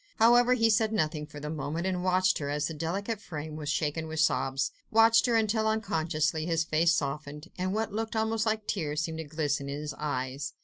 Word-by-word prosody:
However, 240 Hz, +2 st, +5 dB
he 225 Hz, -2 st, +3 dB
said 215 Hz, 0 st, +2 dB
nothing 155 Hz, -7 st, -1 dB
for 145 Hz, -, -10 dB
the 150 Hz, +1 st, -5 dB
moment, 155 Hz, +2 st, -3 dB
but 180 Hz, -, -2 dB
watched 185 Hz, 0 st, +2 dB
her, 140 Hz, -2 st, -3 dB
as 150 Hz, +1 st, 0 dB
her -, -, -5 dB
delicate 195 Hz, +8 st, -3 dB
frame 155 Hz, -3 st, -6 dB
was 150 Hz, -2 st, -5 dB
shaken 160 Hz, +1 st, -1 dB
with 160 Hz, 0 st, -4 dB
sobs, 135 Hz, -4 st, +1 dB, 0.2 s
watched 225 Hz, +2 st, +5 dB
her 235 Hz, -, +2 dB
until 220 Hz, 0 st, +2 dB
unconsciously 160 Hz, -7 st, 0 dB
his 165 Hz, -1 st, +1 dB
face 165 Hz, +1 st, +2 dB
softened, 150 Hz, +2 st, -4 dB
and 185 Hz, +1 st, -2 dB
what 220 Hz, +1 st, -2 dB
looked 225 Hz, +1 st, -3 dB
almost 220 Hz, 0 st, 0 dB
like 220 Hz, -1 st, 0 dB
tears 155 Hz, -7 st, -1 dB
seemed 160 Hz, -1 st, -4 dB
to 160 Hz, -, -4 dB
glisten 145 Hz, -2 st, -2 dB
in 140 Hz, +1 st, -4 dB
his 150 Hz, -1 st, -5 dB
eyes. 140 Hz, -1 st, -3 dB
160 Hz, 210 wpm, -29 LUFS, 150-215 Hz, 0.2 s, However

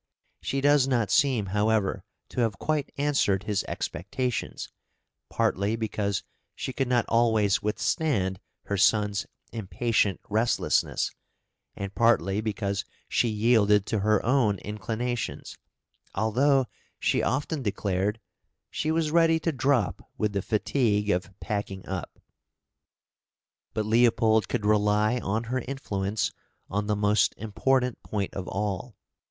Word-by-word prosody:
She 135 Hz, +1 st, -2 dB
does 145 Hz, -1 st, +4 dB
not 120 Hz, -7 st, +1 dB
seem, 130 Hz, -7 st, +3 dB
however, 105 Hz, -2 st, +1 dB, 0.3 s
to -, -, -5 dB
have 115 Hz, -4 st, 0 dB
quite 155 Hz, -3 st, -1 dB
answered 140 Hz, -10 st, +1 dB
his 105 Hz, -2 st, -1 dB
expectations, 125 Hz, +6 st, -3 dB, 0.6 s
partly 100 Hz, +3 st, +1 dB
because 105 Hz, -3 st, -2 dB, 0.3 s
she 130 Hz, -, -4 dB
could 135 Hz, 0 st, -1 dB
not 120 Hz, -2 st, +2 dB
always 110 Hz, -4 st, +3 dB
withstand 105 Hz, -, 0 dB, 0.2 s
her 100 Hz, -, -2 dB
son's 105 Hz, 0 st, +2 dB, 0.2 s
impatient 110 Hz, -1 st, 0 dB
restlessness, 110 Hz, +3 st, +1 dB, 0.6 s
and 100 Hz, 0 st, -5 dB
partly 105 Hz, -4 st, +2 dB
because 100 Hz, -2 st, -2 dB, 0.3 s
she 120 Hz, -, +2 dB
yielded 105 Hz, -2 st, +3 dB
to 110 Hz, -2 st, -1 dB
her 105 Hz, +1 st, +2 dB
own 115 Hz, -5 st, +3 dB
inclinations, 115 Hz, +3 st, -3 dB, 0.6 s
although 130 Hz, +6 st, +3 dB, 0.3 s
she -, -, +1 dB
often 145 Hz, +3 st, -1 dB
declared 100 Hz, -1 st, -1 dB, 0.5 s
"she 155 Hz, -, -2 dB
was 160 Hz, -1 st, +1 dB
ready 165 Hz, 0 st, +4 dB
to 165 Hz, -, 0 dB
drop 130 Hz, -, 0 dB
with 105 Hz, -1 st, 0 dB
the 100 Hz, -, 0 dB
fatigue 105 Hz, -1 st, +1 dB
of 95 Hz, +1 st, -3 dB
packing 100 Hz, -3 st, -4 dB
up." 95 Hz, -2 st, -5 dB, 1.6 s
But 110 Hz, -1 st, 0 dB
Leopold 110 Hz, -2 st, +3 dB
could 110 Hz, -4 st, -1 dB
rely 105 Hz, +2 st, +3 dB
on 110 Hz, +1 st, -1 dB
her 125 Hz, +3 st, -2 dB
influence 105 Hz, -6 st, -2 dB, 0.4 s
on 105 Hz, +2 st, -1 dB
the 105 Hz, -, +1 dB
most 105 Hz, 0 st, +2 dB
important 125 Hz, +3 st, 0 dB
point 100 Hz, -3 st, -3 dB
of 95 Hz, -1 st, -5 dB
all. 105 Hz, +3 st, -3 dB
110 Hz, 125 wpm, -27 LUFS, 100-125 Hz, 1.6 s, does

